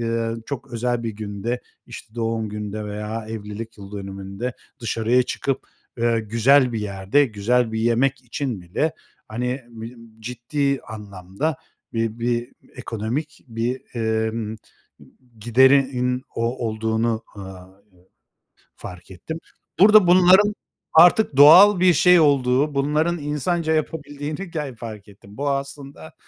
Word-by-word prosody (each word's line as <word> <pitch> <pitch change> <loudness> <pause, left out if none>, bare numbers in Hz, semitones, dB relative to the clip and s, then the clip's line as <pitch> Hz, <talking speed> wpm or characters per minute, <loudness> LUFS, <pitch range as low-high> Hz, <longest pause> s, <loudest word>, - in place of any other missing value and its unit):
ııı, 115 0 -2
çok 135 -2 -6
özel 120 0 -1
bir 115 - -2
günde, 105 +3 -4 0.3
işte, 110 - -11
doğum 115 -2 -2
günde 105 0 -5
veya 105 +2 -5
evlilik 110 +1 -7
yıl 100 0 -11
dönümünde 100 +4 -6 0.3
dışarıya 115 +2 +1
çıkıp, 135 +1 -2 0.4
eee, 115 -1 +1
güzel 120 +4 +3
bir 110 - -2
yerde, 100 +7 +1
güzel 115 +2 0
bir 110 - -2
yemek 125 +3 +1
için 120 -4 -4
bile, 100 - -2 0.4
hani, 125 +4 -3
b 115 -1 -9 0.3
ciddi 130 +4 -2
anlamda 105 - -5 0.4
bi 115 0 -2
bi 120 0 -1 0.2
ekonomik 120 +10 -5
bir, 115 +3 -2 0.5
ımm, 110 -1 -5 0.8
giderin 125 +1 +3
o 115 +1 -2
olduğunu, 110 +1 -1
ııı, 95 0 -11 0.9
fark 90 +1 -11
ettim. 160 - -7 0.4
Burada 210 -1 +7
bunların 185 +4 +6 0.4
artık 170 -1 +5
doğal 180 +7 +9
bir 180 -1 +5
şey 180 +3 +5
olduğu, 140 -1 +2
bunların 150 +5 +1
insanca 155 +3 -1
yapabildiğini 150 +2 -4
ger 150 -6 -4
fark 110 -3 -9
ettim. 100 +1 -16
Bu 145 0 -1
aslında 140 +2 -6
120 Hz, 120 wpm, -22 LUFS, 110-145 Hz, 0.9 s, doğal